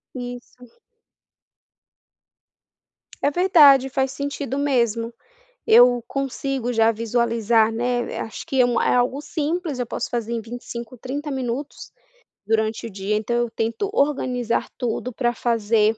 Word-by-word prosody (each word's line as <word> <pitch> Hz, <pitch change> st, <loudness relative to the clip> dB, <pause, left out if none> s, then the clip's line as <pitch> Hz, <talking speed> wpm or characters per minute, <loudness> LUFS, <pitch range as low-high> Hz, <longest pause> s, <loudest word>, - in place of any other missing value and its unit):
Isso. 245 Hz, -, -9 dB, 2.4 s
É -, -, +3 dB
verdade. 290 Hz, -6 st, +6 dB
Faz 265 Hz, 0 st, 0 dB
sentido 280 Hz, -1 st, -4 dB
mesmo. 235 Hz, -5 st, 0 dB, 0.5 s
Eu 245 Hz, -, +6 dB
consigo 270 Hz, -2 st, -3 dB
já 225 Hz, -1 st, +4 dB
visualizar, 230 Hz, 0 st, +1 dB
né, 245 Hz, +1 st, -2 dB
acho 225 Hz, -, -7 dB
que 265 Hz, -, 0 dB
é -, -, +7 dB
uma 245 Hz, -1 st, +1 dB
é -, -, +3 dB
algo 250 Hz, +3 st, +1 dB
simples, 305 Hz, -1 st, -3 dB
eu 245 Hz, -, -1 dB
posso -, -, -4 dB
fazer 235 Hz, -1 st, -3 dB
em 235 Hz, -, -1 dB
25, 235 Hz, +1 st, -8 dB
30 280 Hz, +5 st, -5 dB
minutos, 265 Hz, 0 st, -4 dB, 0.5 s
durante 220 Hz, +1 st, 0 dB
o -, -, -8 dB
dia. 200 Hz, +1 st, -2 dB
Então 215 Hz, +3 st, -1 dB
eu 240 Hz, 0 st, 0 dB
tento 230 Hz, -, -2 dB
organizar 255 Hz, -, 0 dB
tudo 245 Hz, 0 st, -3 dB
pra 240 Hz, 0 st, 0 dB
fazer 225 Hz, -2 st, +1 dB
245 Hz, 130 wpm, -22 LUFS, 230-270 Hz, 2.4 s, é